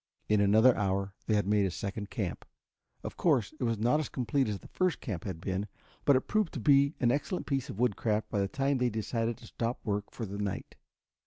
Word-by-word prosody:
In 105 -1 +3
another 110 +5 +6
hour 100 -1 -1
they 110 - +3
had 105 - +2
made 100 -1 +3
a - - -1
second 100 +3 -5
camp. 95 -6 -3 0.6
Of - - -6
course, 135 - +2
it - - -2
was 115 -1 0
not 120 +8 +2
as 155 - -3
complete 130 +2 0
as 105 -2 -2
the - - -14
first 185 -2 0
camp 100 - -5
had 95 -5 -4
been, 95 +3 -2 0.4
but 140 - +6
it 130 - +3
proved 215 +2 0
to - - -2
be 140 +5 +4
an 120 -2 +3
excellent 145 +6 -1
piece 135 0 -1
of 100 - -6
woodcraft 110 -2 +1
by 105 - 0
the 100 - +1
time 135 +4 0
they 125 -1 +2
decided 115 +1 -2
to - - -14
stop 115 +1 -3
work 105 -1 -1
for 115 - -5
the 100 0 -6
night. 100 -2 -3
110 Hz, 230 wpm, -30 LUFS, 100-130 Hz, 0.6 s, another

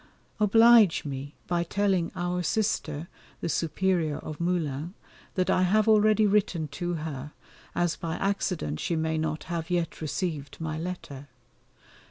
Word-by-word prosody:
Oblige 225 -3 +6
me 140 0 -6
by 175 -1 0
telling 190 -1 0
our 175 0 -1
Sister, 170 -5 -1 0.3
the - - -3
Superior 165 -1 0
of 155 -2 -7
Moulins, 170 -1 -1 0.4
that 185 -2 +1
I - - +3
have 210 +4 +3
already 215 0 +5
written 195 -6 +1
to 175 +5 -3
her, 150 -2 -5 0.4
as 175 -1 +1
by 165 -1 -3
accident 180 - -1
she 170 - -1
may 160 0 0
not 155 -1 -2
have 165 -2 -4
yet 175 -2 -1
received 155 -2 -3
my 155 -1 -3
letter. 160 -5 -6
170 Hz, 140 wpm, -27 LUFS, 155-190 Hz, 0.4 s, Oblige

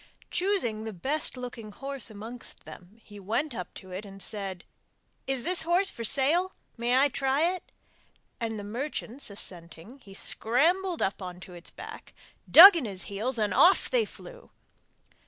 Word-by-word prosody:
Choosing 350 - 0
the 220 -1 -6
best 270 - -1
looking 240 -4 -7
horse 275 +3 -6
amongst 225 +4 -8
them 190 +6 -13
he 205 -1 -12
went 230 +9 -2
up 180 -5 -6
to 185 - -11
it 185 +3 -6
and 195 -1 -11
said: 195 -2 -6 0.6
'Is 265 -2 +1
this 360 +4 +2
horse 350 +4 +1
for 230 - -7
sale? 305 - +2 0.2
may 240 +2 +1
I 275 +2 +5
try 280 +6 +1
it?' 370 - -10 0.7
and, 225 -1 -3
the 205 - -6
merchants 245 +3 -4
assenting, 180 - -3
he 195 -6 -14
scrambled 335 - +1
up 195 - -2
on 180 -1 -7
its 175 -1 -8
back, - - -11 0.3
dug 385 +3 +11
in 320 -7 -1
his 195 -3 -4
heels, 225 +6 -3
and 210 -3 0
off 370 +3 +5
they 485 -3 +2
flew. - - -13
240 Hz, 160 wpm, -28 LUFS, 200-305 Hz, 0.7 s, dug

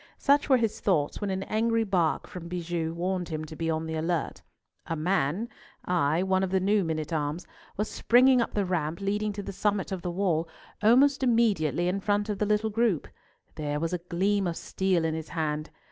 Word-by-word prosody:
Such 285 +1 +3
were 260 - +6
his 225 -3 -1
thoughts 155 -5 0
when 205 - -1
an 190 0 -2
angry 225 +2 +1
bark 180 -6 +1
from 175 -2 -8
Bijou 170 -2 -3
warned 180 +1 -2
him 155 -1 -4
to 155 - -9
be 165 +1 -2
on 160 0 -1
the 160 - -4
alert. 160 0 -2 0.5
A 165 - -2
man—ay, 175 -1 -1
one 190 0 +2
of 190 - 0
the 190 +1 +2
new 200 +2 +2
men 160 -2 -1
at 155 +1 -4
arms—was 160 +7 -4
springing 250 +3 +4
up 230 - -3
the 205 -2 +1
ramp 170 -3 -2
leading 205 +2 -1
to 205 0 -5
the 195 - -6
summit 200 0 -1
of 190 -2 -3
the 180 - -3
wall 170 -3 0 0.3
almost 260 +6 +5
immediately 205 - +2
in 185 +2 0
front 205 +1 0
of 205 -2 -2
the 210 - +1
little 210 +1 +1
group. 220 -7 +1 0.4
There 150 -1 -3
was 165 +2 -2
a 180 - -1
gleam 190 +3 0
of 170 - -3
steel 185 -3 0
in 160 - 0
his 160 0 -5
hand. 155 -2 -2
185 Hz, 205 wpm, -28 LUFS, 160-210 Hz, 0.5 s, were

